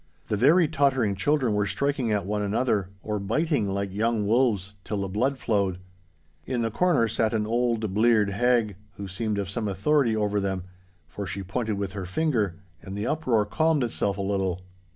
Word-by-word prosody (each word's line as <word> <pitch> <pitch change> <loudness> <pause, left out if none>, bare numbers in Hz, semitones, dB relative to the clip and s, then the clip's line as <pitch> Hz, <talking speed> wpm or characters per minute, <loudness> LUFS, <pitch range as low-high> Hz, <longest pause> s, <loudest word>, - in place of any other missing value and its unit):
The 105 - +1
very 155 - +5
tottering 135 -8 +2
children 130 +2 +1
were 105 -1 +1
striking 140 0 -1
at 105 -2 0
one 105 +1 -1
another, 105 -2 0
or 105 -1 -2
biting 140 - 0
like 100 0 -2
young 110 +1 0
wolves, 105 -4 +1
till 105 - -3
the 100 - -2
blood 125 +8 0
flowed. 100 -7 0 0.7
In 125 -3 -1
the 115 - -1
corner 150 -4 +2
sat 110 +1 0
an 105 -1 0
old 115 -2 0
bleared 110 -1 +3
hag, 115 -2 +1 0.2
who 100 +1 -7
seemed 105 +3 -2
of 100 -2 -2
some 105 +2 -3
authority 125 +3 +2
over 105 -1 0
them, 95 -2 -2 0.4
for 100 +5 -6
she 95 +1 -4
pointed 105 +2 -2
with 100 -2 -3
her 95 -3 -5
finger, 110 - 0 0.3
and 95 +1 -7
the 105 - -2
uproar 130 -9 +1
calmed 155 +5 +1
itself 100 -4 -1
a - - -2
little. 95 -2 -1
105 Hz, 185 wpm, -26 LUFS, 100-125 Hz, 0.7 s, very